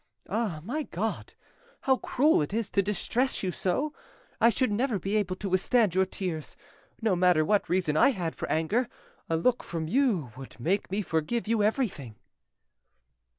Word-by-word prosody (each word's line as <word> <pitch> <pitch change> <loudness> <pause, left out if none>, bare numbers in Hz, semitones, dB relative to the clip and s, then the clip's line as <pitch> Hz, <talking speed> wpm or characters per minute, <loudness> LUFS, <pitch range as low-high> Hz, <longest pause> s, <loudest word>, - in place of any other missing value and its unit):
Ah, 205 -9 -1
my 270 - -2
God! - - -4 0.5
how 265 -1 +3
cruel 285 - +2
it 150 +8 -2
is 225 -2 -2
to 200 - +3
distress 210 +6 -1
you 185 - 0
so! 265 - -1 0.5
I 230 0 +6
should 245 0 +1
never 230 +1 +1
be 195 +3 -2
able 190 -4 0
to 195 - -5
withstand 195 +2 +2
your 190 0 +2
tears; 175 -5 -5 0.5
no 215 -5 +3
matter 175 -3 +4
what 205 +4 +1
reason 175 -4 +1
I 155 - +6
had 175 -10 -2
for - - -5
anger, 210 +11 +1 0.4
a 165 - +2
look 245 +8 +1
from 165 -2 -4
you 200 - +1
would 130 -1 -11
make 185 - 0
me 200 +3 -1
forgive 175 +8 -1
you 225 -1 +2
everything." 205 - -1
195 Hz, 170 wpm, -28 LUFS, 170-235 Hz, 0.5 s, I